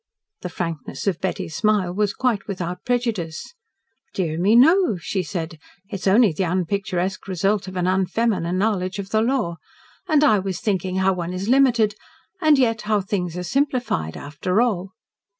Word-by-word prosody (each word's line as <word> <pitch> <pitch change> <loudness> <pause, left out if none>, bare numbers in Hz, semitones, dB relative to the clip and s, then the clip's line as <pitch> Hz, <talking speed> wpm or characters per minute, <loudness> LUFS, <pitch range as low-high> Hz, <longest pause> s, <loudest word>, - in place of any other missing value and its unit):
The - - -5
frankness 165 -5 -5
of 190 -4 -1
Betty's 170 -4 -3
smile 210 -5 +1
was 205 +1 0
quite 240 -6 0
without 180 -2 -5
prejudice. 230 - -2 0.6
"Dear 165 -5 -1
me, 200 +5 +4
no," 305 - +5
she 185 +3 -2
said. 165 -1 -5 0.3
"It - - -9
is 195 0 -3
only 210 +1 +5
the 155 - -3
unpicturesque 185 +1 -2
result 195 +2 0
of 185 - -8
an 180 -1 0
unfeminine 185 -1 0
knowledge 190 -2 0
of 195 0 -6
the 220 - +3
law. 230 -8 0 0.5
And 305 -3 +3
I 215 -9 +5
was 190 -1 -3
thinking 190 -3 -1
how 190 0 +2
one 175 -1 -4
is 190 +4 -3
limited 240 -5 +4 0.5
and 310 -3 +5
yet 225 -4 +2
how 210 -1 +3
things 180 -3 -3
are 180 - -3
simplified 245 - -1
after 180 +7 -2
all." 200 -5 0
190 Hz, 170 wpm, -22 LUFS, 180-220 Hz, 0.6 s, no